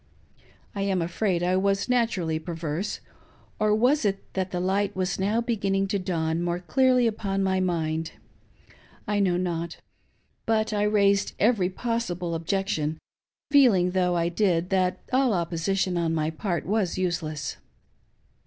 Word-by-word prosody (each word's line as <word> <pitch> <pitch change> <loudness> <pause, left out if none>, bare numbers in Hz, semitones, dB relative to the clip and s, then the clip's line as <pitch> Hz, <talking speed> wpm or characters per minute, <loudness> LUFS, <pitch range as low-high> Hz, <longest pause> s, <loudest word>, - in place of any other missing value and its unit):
I 200 - -3
am 195 -2 +1
afraid 175 +1 0
I 180 +1 +2
was 195 +1 +1
naturally 215 -10 +1
perverse, 165 +2 -4 0.3
— - - -31
or 210 0 +3
was 250 +6 +3
it 195 -2 -2
that 190 -1 -1
the 180 - -3
light 195 +2 0
was 185 0 -1
now 210 +4 +1
begin 215 -5 -1
ning 195 0 +1
to 200 - 0
dawn 165 -3 -1
more 175 0 -1
clearly 255 +6 +3
upon 200 -3 -1
my 190 0 +1
niind 165 -3 -1 0.5
.' - - -27
I 210 -1 +1
know 185 -3 +2
not. 170 -2 -3 0.7
But 220 -1 +1
I 205 - 0
raised 200 -1 +2
every 205 -4 +2
possible 185 -5 -2
objection, 165 -2 -1 0.5
feeling, 220 -11 +5
though 180 -1 +1
I 170 0 +1
did, 175 -1 +1
that 185 -1 +1
all 255 -4 +3
opposition 175 +2 -1
on 165 -1 0
my 155 0 0
part 170 -1 -3
was 200 -3 0
useless. 160 -6 -2
185 Hz, 155 wpm, -26 LUFS, 170-205 Hz, 0.7 s, feeling